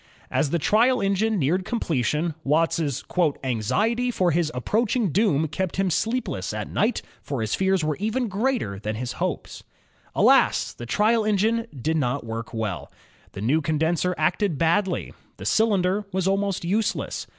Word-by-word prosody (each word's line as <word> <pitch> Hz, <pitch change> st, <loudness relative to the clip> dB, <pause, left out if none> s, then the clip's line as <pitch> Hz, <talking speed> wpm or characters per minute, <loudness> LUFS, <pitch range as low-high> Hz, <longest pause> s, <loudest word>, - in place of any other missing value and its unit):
As 150 Hz, -, +1 dB
the 170 Hz, -, +1 dB
trial 235 Hz, -, +3 dB
engine 200 Hz, +3 st, +1 dB
neared 175 Hz, +4 st, +1 dB
completion. 160 Hz, -, -1 dB
Watt's 165 Hz, +4 st, +2 dB, 0.6 s
"anxiety 210 Hz, -, 0 dB
for 185 Hz, -7 st, +1 dB
his 160 Hz, -1 st, +1 dB
approaching 215 Hz, -, 0 dB
doom 160 Hz, -5 st, +2 dB
kept 170 Hz, +4 st, -3 dB
him 190 Hz, -1 st, +1 dB
sleepless 235 Hz, +9 st, -1 dB
at -, -, -5 dB
night, 230 Hz, +3 st, 0 dB, 0.2 s
for 140 Hz, -3 st, -4 dB
his 110 Hz, -1 st, -2 dB
fears 190 Hz, -2 st, +1 dB
were 155 Hz, -1 st, 0 dB
even 220 Hz, +5 st, -1 dB
greater 210 Hz, -, -1 dB
than 110 Hz, +1 st, -3 dB
his 120 Hz, +2 st, -4 dB
hopes." -, -, -3 dB, 0.5 s
Alas! -, -, +4 dB
thes 120 Hz, -, -9 dB
trial 215 Hz, -, +2 dB
engine 220 Hz, +3 st, +1 dB
did 160 Hz, +6 st, 0 dB
not 135 Hz, -2 st, -1 dB
work 115 Hz, 0 st, -5 dB
well. 100 Hz, -10 st, -4 dB, 0.4 s
The 95 Hz, -, -7 dB
new 140 Hz, +9 st, +2 dB
condenser 160 Hz, +4 st, 0 dB
acted 175 Hz, +2 st, +1 dB
badly. 175 Hz, +4 st, +1 dB, 0.2 s
The -, -, -9 dB
cylinder 205 Hz, -2 st, +2 dB
was 190 Hz, 0 st, 0 dB
almost 195 Hz, -2 st, 0 dB
useless. 210 Hz, +5 st, -1 dB
180 Hz, 150 wpm, -24 LUFS, 145-215 Hz, 0.6 s, Alas